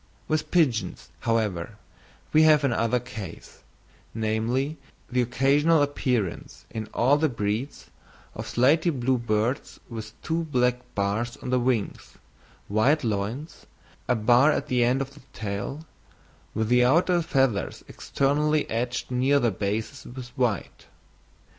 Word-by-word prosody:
With 155 0 -1
pigeons, 125 - +1
however, 105 -4 -1 0.6
we 155 - +6
have 155 -2 +6
another 120 -2 +1
case, 105 -4 -9 0.6
namely, 115 +7 -1 0.3
the 125 0 +2
occasional 140 +6 +3
appearance 125 -9 -2
in 110 -1 -5
all 135 +5 +3
the 155 +1 +2
breeds, 115 +3 -3 0.4
of - - -6
slaty 150 +8 +3
blue 130 -4 0
birds 115 +4 -1
with 110 -1 -8
two 165 +1 -1
black 125 -4 +1 0.2
bars 105 +4 -1
on 125 - -6
the 130 - +3
wings, 120 -4 -1 0.5
white 130 +9 +2
loins, 115 +8 -3 0.4
a 125 - +3
bar 120 +6 +5
at - - -2
the 125 -1 +3
end 125 +3 +2
of 135 +1 -12
the 145 - -15
tail, 105 +9 -5 0.7
with 110 0 0
the 125 0 +5
outer 175 +7 +3
feathers 135 -9 0
externally 150 +2 0
edged 120 +3 -2
near 130 +3 +3
their 120 -4 +2
bases 110 +8 -4
with 125 -1 -8
white. 125 -5 -2
125 Hz, 130 wpm, -26 LUFS, 110-145 Hz, 0.7 s, we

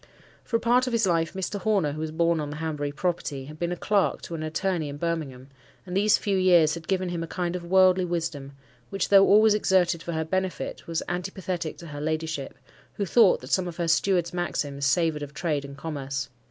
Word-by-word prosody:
For 230 - -3
a - - +4
part 245 +2 +3
of 250 - -2
his 225 -2 +2
life 165 -2 +1
Mr. 190 +2 -3
Horner, 200 -9 +1
who 150 - -6
was 160 0 -3
born 170 +1 +1
on 150 -1 -3
the 145 - -6
Hanbury 150 -2 -3
property, 145 -4 -3
had 155 +2 -11
been 175 0 -1
a - - -1
clerk 200 +2 +1
to - - -7
an 165 - -4
attorney 160 0 -1
in 140 - -7
Birmingham; 145 -6 -4 0.4
and 180 -1 -6
these 205 +2 +4
few 200 -2 -1
years 175 -4 +5
had 170 -2 -7
given 185 -1 0
him 175 -1 -3
a 165 - -4
kind 175 +1 -3
of 180 - -5
worldly 185 +1 +4
wisdom, 165 -5 -3 0.4
which, 195 - -2
though 195 -1 +7
always 215 +1 +6
exerted 185 -4 +2
for 170 - -5
her 160 0 -1
benefit, 185 +2 -3
was 165 -1 -2
antipathetic 180 -2 -4
to 170 - -11
her 145 -2 -7
ladyship, 155 -2 -3 0.4
who 200 - -2
thought 210 0 +4
that - - -10
some 185 -1 +2
of 170 - -7
her 170 - -1
steward's 175 0 +2
maxims 145 -6 -2
savoured 160 +1 +1
of 145 0 -7
trade 150 -5 -1
and 140 0 -9
commerce. 140 -3 -4
170 Hz, 220 wpm, -26 LUFS, 155-185 Hz, 0.4 s, though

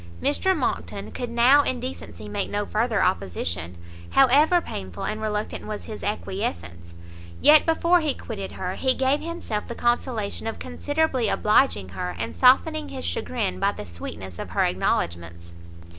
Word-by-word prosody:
Mr 380 +6 +1
Monckton - - -3
could 245 -2 -5
now 240 +5 +6
in 255 -3 -1
decency 85 +3 -7
make 105 - -2
no 205 0 -1
further 220 +1 +1
opposition, 85 - -2 0.3
however 290 +7 +5
painful 95 - -7
and 215 0 -3
reluctant 210 -1 -3
was 215 -1 -5
his 215 - -8
acquiescence; 85 - -4 0.4
yet 305 +1 +6
before 335 +2 +4
he 305 -4 0
quitted 200 -4 -6
her, 185 0 -4
he 260 +4 +1
gave 265 +2 +2
himself 330 -11 -4
the 235 - -6
consolation 240 -3 -1
of 225 - -3
considerably 275 -3 -1
obliging 210 - +2
her, 90 -1 -4
and 80 -2 -4
softened 90 +3 +4
his 90 - -6
chagrin 85 +1 -2
by - - +2
the - - -8
sweetness 85 +2 -8
of - - -5
her - - +1
acknowledgments. 85 0 -2
210 Hz, 155 wpm, -24 LUFS, -, 0.4 s, now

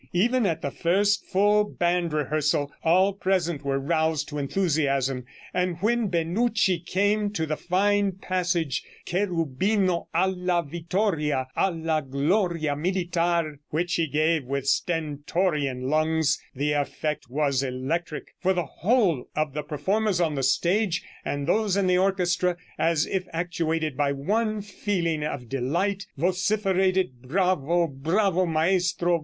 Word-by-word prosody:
Even 230 +5 +2
at 165 -2 -2
the 140 - -2
first 200 +6 +1
full 205 +2 +3
band 175 -4 0
rehearsal, 150 -1 0
all 185 +4 +4
present 180 -6 -1
were 135 -1 0
roused 160 +2 0
to 150 -1 -4
enthusiasm, 140 -5 0 0.3
and 180 -2 0
when 235 +1 +1
Benucci 185 +2 +1
came 205 +4 +1
to 165 -6 -2
the 155 0 -2
fine 200 +3 +1
passage 175 -5 -1 0.2
'Cherubino 180 +1 0
Alla 180 0 +1
Vittoria, 160 -5 -1
Alla 165 -4 0
Gloria 155 +3 0
Militar,' 170 -2 0
which 175 +3 -1
he 165 -1 +1
gave 155 +1 +1
with 140 +1 -3
stentorian 150 -2 0
lungs, 155 0 +1
the 145 +3 0
effect 145 -1 -2
was 140 0 +1
electric, 140 +5 -3
for 190 +1 +3
the 175 -2 -1
whole 185 - +1
of 155 -2 -1
the 150 - -2
performers 185 +7 0
on 165 -3 +1
the 135 - -2
stage, 175 - +1 0.2
and 145 0 -3
those 200 +3 +1
in 200 - +2
the 180 0 +3
orchestra, 180 -2 +1 0.2
as 165 -2 +2
if 185 -1 -2
actuated 165 -3 -1
by 140 +1 +1
one 210 +9 -1
feeling 180 -6 -2
of 140 -5 -4
delight, 170 - -1
vociferated 185 - +1
'_Bravo, 175 +1 +1
Bravo, 175 +6 +1
Maestro. 175 +1 +1
170 Hz, 130 wpm, -25 LUFS, 150-190 Hz, 0.3 s, all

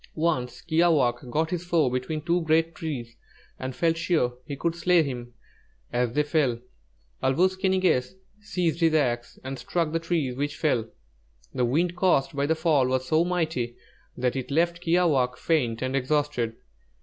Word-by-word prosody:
Once 155 -7 -1
Kiāwāhq' 150 -8 +2
got 160 +5 0
his 175 -1 -2
foe 170 -5 +2
between 130 +5 -2
two 175 +1 +1
great 160 +1 +2
trees 135 -8 -5 0.4
and 130 0 -5
felt 165 -1 +2
sure 160 -7 +1
he 140 - -4
could 165 +4 -1
slay 175 0 +3
him 120 -4 -6 0.6
as 120 -1 0
they 150 - +2
fell. 145 -5 +1 0.6
Āl 130 0 +2
wūs 185 +3 +3
ki 190 0 0
ni 190 - +2
gess 175 -4 +1 0.2
seized 180 -6 -1
his 165 -2 +3
axe 120 -5 0
and 130 0 -5
struck 165 +4 -1
the 165 - 0
trees 165 -6 -1
which 145 +3 -3
fell. 120 -8 0 0.6
The 125 - +1
wind 170 +8 +1
caused 175 -7 +2
by 140 0 0
their 160 - +2
fall 155 -5 +2
was 130 0 -1
so 155 +1 +4
mighty 160 -9 -1 0.4
that 125 0 0
it 130 -2 -4
left 170 +3 +1
Kiāwāhq' 160 -8 +2
faint 125 -8 0
and 130 +1 -1
exhausted. 135 -4 0
150 Hz, 175 wpm, -26 LUFS, 125-170 Hz, 0.6 s, so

